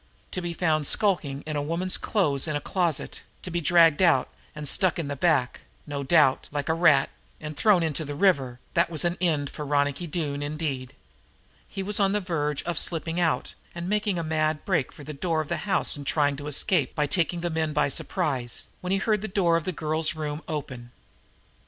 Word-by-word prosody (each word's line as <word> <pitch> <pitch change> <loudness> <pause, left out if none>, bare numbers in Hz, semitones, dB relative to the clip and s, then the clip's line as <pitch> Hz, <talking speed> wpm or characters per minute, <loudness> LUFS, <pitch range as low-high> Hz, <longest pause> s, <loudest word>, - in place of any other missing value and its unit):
To 185 - -3
be 175 -1 -4
found 155 -4 +1
skulking 155 -9 +1
among 145 -2 -3
woman's 180 +3 +1
clothes 155 -9 0
in 155 - -1
a - - 0
closet 170 -1 -1 0.2
to 180 - -6
be 175 0 -1
dragged 165 -1 +5
out 170 -8 +4 0.3
and 150 -1 -4
stuck 185 +5 +3
in 160 -4 -3
the 145 - -2
back, 140 -4 +1 0.2
no 145 -1 -4
doubt, 140 -2 +3
like 145 +1 -3
a - - +3
rat, 150 -5 +4 0.3
and 150 0 -7
thrown 190 +1 +4
into 160 0 -1
the 145 -1 -5
river, 140 -9 +2
that 170 0 +2
was 165 0 -1
an 175 0 +1
end 150 -5 +1
for 150 - -6
Ronicky 145 +3 0
Doone 145 -3 -3
indeed! 145 -3 -4 0.7
He 195 - -5
was 205 +2 -1
on 195 -1 +3
the 210 - +2
verge 150 -6 -2
of 170 -2 0
slipping 165 0 -1
out 165 -2 0 0.2
and 170 0 -5
making 210 -1 0
a 170 - -2
mad 155 -1 -1
break 170 - 0
for 145 - -12
the 150 - -7
door 160 +3 -1
of 155 - -3
the - - -1
house - - +3
and 140 -1 -8
trying 145 -2 +2
to 145 +1 -7
escape 150 - +1
by 150 - +1
taking 170 +3 0
the 175 0 -2
men 160 -1 0
by - - +2
surprise, 135 - -2
when 180 - -5
he 195 - +2
heard 210 +1 +1
the 215 - -3
door 185 -4 +2
of 165 -1 -1
the 185 - -1
girl's 155 0 -1
room 150 -1 -4
open. 130 -6 -5
155 Hz, 210 wpm, -26 LUFS, 145-175 Hz, 0.7 s, dragged